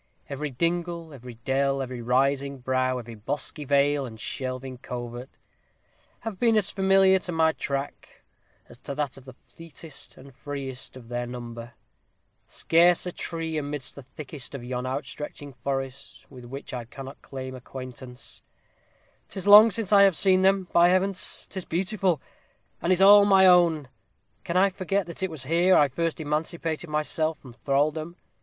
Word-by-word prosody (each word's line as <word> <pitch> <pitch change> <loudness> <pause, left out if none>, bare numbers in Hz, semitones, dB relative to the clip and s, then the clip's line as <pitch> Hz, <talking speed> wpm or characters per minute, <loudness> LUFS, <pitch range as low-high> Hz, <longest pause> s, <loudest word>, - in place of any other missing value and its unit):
Every 145 +2 -4
dingle, 170 +3 -2
every 125 -3 -10
dell, 135 +3 0
every 130 -2 -5
rising 135 +3 +1
brow, 130 0 0
every 120 -1 -8
bosky 145 +7 -4
vale 140 +1 +2
and 110 -4 -8
shelving 130 +1 -5
covert, 120 +1 -7 0.9
have 220 -5 -6
been 230 -2 +3
as 205 -1 +1
familiar 190 0 +4
to 180 - -6
my 160 -1 +3
track 140 -2 -5 0.4
as 120 - -15
to 140 - -6
that 145 -3 -2
of 135 - -14
the 130 - -11
fleetest 165 -2 -11
and 135 +1 -14
freest 135 -1 -7
of 120 -3 -13
their 120 0 -3
number: 120 -1 -8 0.7
scarce 170 +2 +3
a 180 - -3
tree 165 -2 -3
amidst 145 -3 -5
the 140 - -10
thickest 140 +1 -9
of 130 - -7
yon 125 +1 -4
outstretching 145 +1 -6
forest 135 0 -5
with 125 -2 -11
which 135 +3 -8
I 120 -2 -4
cannot 135 +3 -10
claim 130 -1 -7
acquaintance; 130 0 -9 0.9
'tis 190 - -5
long 210 +2 +10
since 215 -1 -2
I 200 - +8
have 195 -3 +5
seen 185 0 +4
them. 190 -1 +3
By 170 0 +6
Heavens! 185 +1 -1
'tis 190 - -6
beautiful! 185 -1 0 0.6
and 175 - 0
it - - +6
is 190 - +3
all 205 +1 +9
my 195 -2 +6
own! 170 -5 +5 0.6
Can 170 - -1
I 195 +1 +4
forget 195 +1 -1
that 170 +2 -8
it 190 - 0
was 155 -5 -7
here 170 +6 +3
I 145 - +5
first 165 +5 -2
emancipated 160 +2 -3
myself 155 +1 0
from 130 -4 -14
thraldom? 150 +7 -1
145 Hz, 165 wpm, -26 LUFS, 130-175 Hz, 0.9 s, long